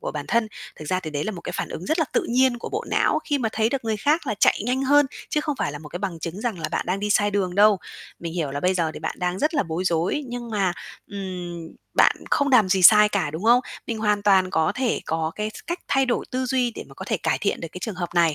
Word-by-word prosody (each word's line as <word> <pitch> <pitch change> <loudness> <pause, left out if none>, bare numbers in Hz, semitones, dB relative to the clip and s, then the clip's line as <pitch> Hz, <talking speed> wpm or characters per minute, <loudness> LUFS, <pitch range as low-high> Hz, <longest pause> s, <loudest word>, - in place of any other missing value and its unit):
của - - -4
bản - - -5
thân. 230 -2 +2 0.3
Thực 155 - -9
ra 185 0 +1
thì 160 -4 -6
đấy 145 0 -2
là 215 - -2
một 175 - -7
cái - - -6
phản - - -3
ứng 175 - -7
rất 315 +2 0
là 320 - +3
tự - - +2
nhiên 250 0 +3
của - - -6
bộ 435 +3 -3
não - - +2
khi 290 -2 0
mà 225 -3 0
thấy 220 0 +1
được 260 -2 -3
người 220 -1 0
khác 295 +10 +1
là 215 - -1
chạy - - +4
nhanh 255 +3 0
hơn, 290 +1 +5 0.2
chứ 300 - +1
không 300 -2 -2
phải 145 - -1
là 145 - -6
một 150 0 -11
cái 175 - -6
bằng 185 -4 -4
chứng 170 +4 -5
rằng 225 -5 -2
là 160 - -3
bạn - - -2
đang 190 +2 -1
đi 210 - -2
sai 205 0 +3
đường 190 -3 -1
đâu. 205 0 +5 0.4
Mình 165 -1 -5
hiểu 160 -6 -2
là 145 - -4
bây 180 +3 +2
giờ 165 -3 0
thì - - -8
bạn - - -4
đang 180 0 -1
rất 310 - 0
là 290 - +3
bối 170 +1 -3
rối 175 - 0
nhưng 240 -1 -6
mà, 195 -4 +1 0.4
ừm, 180 -4 -6 0.3
bạn - - +5
không 285 0 +2
làm 225 -8 +5
gì 185 -1 +2
sai 210 +3 +8
cả, 195 -8 -1
đúng 160 +7 -6
không? 240 +2 +6 0.3
Mình 225 -2 -3
hoàn 210 -1 +1
toàn 190 -2 +4
có 160 +3 +1
thể 255 -2 0
có 160 0 -1
cái 215 0 -3
s - - -8
cách 345 +1 -2
thay 270 -1 +2
đổi 240 - 0
tư 255 0 -1
duy 250 -1 +1
để - - -7
mà - - -14
có - - -8
thể - - 0
cải - - 0
thiện - - -1
được 165 - -5
cái - - -7
trường 215 +2 -4
hợp 175 -1 -3
này. 170 -3 +4
205 Hz, 300 wpm, -24 LUFS, 175-245 Hz, 0.4 s, sai